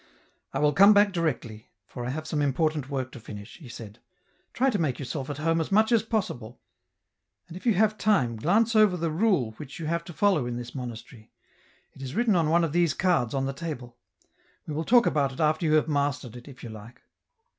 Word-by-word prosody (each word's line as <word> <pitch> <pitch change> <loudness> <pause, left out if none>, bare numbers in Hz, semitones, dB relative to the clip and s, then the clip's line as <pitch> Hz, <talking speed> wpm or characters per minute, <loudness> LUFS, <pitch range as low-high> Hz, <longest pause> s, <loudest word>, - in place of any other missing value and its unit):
" - - -44
I - - -3
will 150 0 +2
come 200 +6 +7
back 205 -1 +4
directly, 125 - -3 0.2
for 120 +2 -8
I 120 - -3
have 155 +4 -4
some 155 -1 -2
important 145 0 0
work 130 -2 -3
to 125 - -10
finish," 105 -2 -10
he 150 -8 -13
said; 110 -3 -10 0.3
" - - -41
try 265 +2 +1
to 205 - -1
make 145 -7 0
yourself 135 +1 -5
at 145 - -4
home 165 +2 +1
as 160 - -5
much 220 +3 +4
as 230 -2 +4
possible, 130 - -4 0.9
and 170 - -11
if 185 - -7
you 225 - +4
have 215 +2 +2
time 160 - +2
glance 215 - +2
over 210 -4 +5
the 165 -1 -2
rule 170 - +1
which 135 -2 -9
you 165 - -6
have 170 +2 -1
to 175 - -9
follow 180 -9 +2
in 120 -1 -4
this 120 0 -7
monastery 120 -3 -8 0.3
— - - -35
it - - -13
is 130 +1 -6
written 230 -3 +2
on 165 -3 +2
one 170 +2 +3
of 165 - -1
these 170 -4 +2
cards 170 -10 +1
on 135 0 0
the 135 - -3
table; 135 -6 -7 0.7
we 155 - -5
will 160 +2 -3
talk 240 0 +5
about 140 -3 +1
it - - -12
after 155 +1 +1
you 155 - +2
have 155 0 +3
mastered 140 -5 -1
it, 120 +2 -11
if 135 -3 -13
you 120 - -7
like." 110 +2 -12
155 Hz, 235 wpm, -26 LUFS, 125-180 Hz, 0.9 s, come